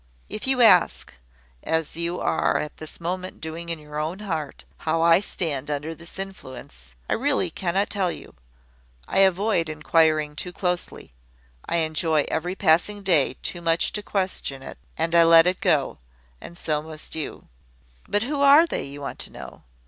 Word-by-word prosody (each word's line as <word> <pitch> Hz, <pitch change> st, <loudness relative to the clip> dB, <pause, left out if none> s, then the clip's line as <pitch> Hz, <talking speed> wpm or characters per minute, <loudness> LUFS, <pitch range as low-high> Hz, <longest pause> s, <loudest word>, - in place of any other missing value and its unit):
If 215 Hz, -, -6 dB
you 260 Hz, -2 st, +3 dB
ask, 225 Hz, -, +4 dB, 0.5 s
as 160 Hz, -2 st, -1 dB
you 170 Hz, +1 st, -2 dB
are -, -, +1 dB
at 150 Hz, -, -5 dB
this 155 Hz, -, -9 dB
moment 180 Hz, +2 st, -4 dB
doing 165 Hz, +2 st, -6 dB
in 165 Hz, -, -2 dB
your 150 Hz, 0 st, -7 dB
own 160 Hz, +4 st, -3 dB
heart, 160 Hz, -8 st, -5 dB
how 165 Hz, +1 st, 0 dB
I 170 Hz, +1 st, +6 dB
stand 150 Hz, -8 st, -3 dB
under 150 Hz, +2 st, -3 dB
this 170 Hz, +2 st, -11 dB
influence, 130 Hz, -, -9 dB
I -, -, 0 dB
really 255 Hz, -, 0 dB
cannot 190 Hz, +4 st, -1 dB
tell 190 Hz, -4 st, +1 dB
you. -, -, -10 dB, 0.7 s
I 195 Hz, -, +1 dB
avoid 190 Hz, -2 st, +3 dB
inquiring 155 Hz, -1 st, +2 dB
too 180 Hz, +3 st, -5 dB
closely. 180 Hz, -, -3 dB, 0.5 s
I -, -, 0 dB
enjoy 155 Hz, -1 st, +1 dB
every 175 Hz, +3 st, -2 dB
passing 195 Hz, +5 st, +2 dB
day 160 Hz, -9 st, +2 dB
too 175 Hz, -, -4 dB
much 165 Hz, 0 st, +1 dB
to 210 Hz, -, -2 dB
question 185 Hz, -10 st, -3 dB
it, -, -, -9 dB, 0.2 s
and 165 Hz, +1 st, -1 dB
I 170 Hz, 0 st, +7 dB
let 165 Hz, 0 st, +7 dB
it 180 Hz, +3 st, 0 dB
go; 155 Hz, -9 st, +1 dB, 0.4 s
and 170 Hz, -, -10 dB
so 155 Hz, -3 st, -1 dB
must 155 Hz, 0 st, -7 dB
you. 160 Hz, -2 st, -5 dB, 0.6 s
"`But 205 Hz, +1 st, +1 dB
who 280 Hz, +3 st, -2 dB
are 285 Hz, +4 st, +7 dB
they?' -, -, -3 dB
you 140 Hz, +1 st, -9 dB
want 140 Hz, -, -6 dB
to -, -, -7 dB
know. -, -, -11 dB
165 Hz, 170 wpm, -24 LUFS, 155-190 Hz, 0.7 s, I